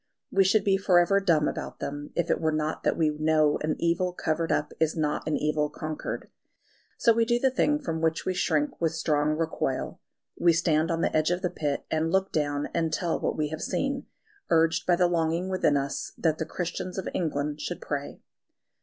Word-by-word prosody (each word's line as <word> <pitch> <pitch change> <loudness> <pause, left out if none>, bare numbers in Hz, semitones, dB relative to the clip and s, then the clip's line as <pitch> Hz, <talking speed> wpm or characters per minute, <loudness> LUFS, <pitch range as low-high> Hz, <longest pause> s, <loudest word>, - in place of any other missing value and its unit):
We 195 - +4
should 200 +3 +3
be 195 -1 +3
for 190 -2 +3
ever 175 +3 +4
dumb 165 -6 +2
about - - -5
them, 145 +1 -5
if 170 - 0
it - - 0
were 160 -1 +2
not 155 0 -2
that - - 0
we 160 -2 +3
know 155 0 +2
an 155 0 0
evil 170 +2 0
covered 165 -1 -1
up 150 - 0
is 160 0 +1
not 150 -1 -1
an 155 - +1
evil 150 0 0
conquered. 155 0 -5 0.7
So 230 - +4
we 230 +1 +3
do 240 +1 +2
the 265 +2 +2
thing 295 +3 +2
from 165 - -4
which 160 0 0
we 185 - 0
shrink 155 -5 0
with 165 -1 +1
strong 155 -1 +1
recoil; 160 -5 -2 0.4
we 170 -1 +4
stand 160 -1 +2
on 165 -1 0
the - - 0
edge 155 +1 +3
of 175 +2 -1
the 180 - 0
pit, 145 -5 -2
and 160 +1 0
look 190 +1 +1
down 145 -1 -1
and 165 -2 0
tell 165 +2 -1
what - - -2
we 150 -1 0
have 155 +1 -5
seen, 275 0 -2 0.4
urged 165 -1 +2
by 175 - +5
the 180 +1 +3
longing 170 +1 0
within 185 -6 +2
us 140 0 -3
that 160 -2 +1
the 160 - -2
Christians 180 +2 -4
of 190 - -3
England 150 -3 -2
should 175 - -4
pray. 145 -1 -5
160 Hz, 210 wpm, -27 LUFS, 155-180 Hz, 0.7 s, by